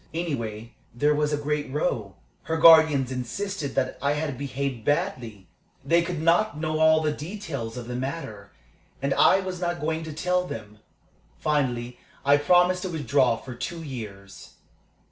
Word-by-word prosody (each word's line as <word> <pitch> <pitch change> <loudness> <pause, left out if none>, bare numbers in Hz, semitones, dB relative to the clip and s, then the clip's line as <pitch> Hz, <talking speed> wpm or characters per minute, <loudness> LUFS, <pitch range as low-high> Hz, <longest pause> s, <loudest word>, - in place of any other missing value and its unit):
Anyway, 115 -9 -4 0.2
there 145 +5 +3
was 150 0 0
a 150 - +1
great 145 -1 -2
row. 120 - -2 0.3
Her 160 - -1
guardians 160 -5 +6
insisted 140 +5 -4
that 130 -1 -1
I 140 +1 +2
had 150 -2 -2
behaved 135 -2 -4
badly. 125 - -2 0.4
They 170 +4 +4
could 170 -1 -3
not 170 +2 +2
know 155 0 -1
all 160 0 +5
the 155 -1 +1
details 150 - -6
of 120 -1 -7
the 125 - -4
matter, 125 -7 -5 0.5
and 140 0 0
I 190 - +5
was 185 -1 -5
not 175 0 -1
going 160 +1 -2
to 160 - -6
tell 180 +3 0
them. 105 -5 -8 0.6
Finally 125 -5 -1 0.3
I 140 +1 +6
promised 180 +4 +3
to 185 - -3
withdraw 145 -7 +2
for 130 +2 -9
two 165 +7 -5
years." 105 -8 -9
145 Hz, 160 wpm, -25 LUFS, 125-165 Hz, 0.6 s, guardians